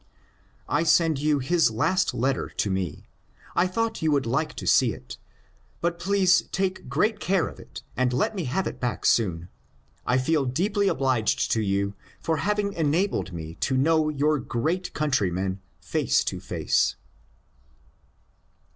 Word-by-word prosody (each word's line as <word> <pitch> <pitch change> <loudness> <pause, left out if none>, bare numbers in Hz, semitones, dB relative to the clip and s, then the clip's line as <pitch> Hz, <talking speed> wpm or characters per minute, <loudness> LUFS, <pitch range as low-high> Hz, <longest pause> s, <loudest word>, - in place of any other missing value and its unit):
I - - +1
send 165 -2 +3
you 150 0 +2
his 160 +2 +2
last 185 - +1
letter 135 +2 -1
to 100 - -2
me. 95 -5 -3 0.5
I 180 - +3
thought 225 +4 -2
you 160 -1 +2
would 140 -3 +2
like 135 +7 -1
to - - -6
see - - +4
it, - - -10 0.6
but 170 0 -1
please 190 0 +3
take 190 -6 -2
great 205 - +1
care 190 -3 +1
of - - -10
it - - -11
and 130 +1 +1
let 125 - 0
me 180 -5 -2
have 155 +10 -1
it - - -5
back 125 -2 -3
soon. 90 -7 +2 0.6
I 125 - +2
feel 140 +2 +1
deeply 200 - 0
obliged 130 - +1
to 110 - +2
you 100 0 0 0.3
for 160 0 -1
having 205 +5 0
enabled 165 - 0
me 80 -2 -6
to 130 - 0
know 155 +3 +3
your 150 0 +1
great 160 +10 -2
countryman 95 - 0 0.2
face - - +1
to - - -3
face." - - 0
150 Hz, 155 wpm, -25 LUFS, 120-180 Hz, 0.6 s, see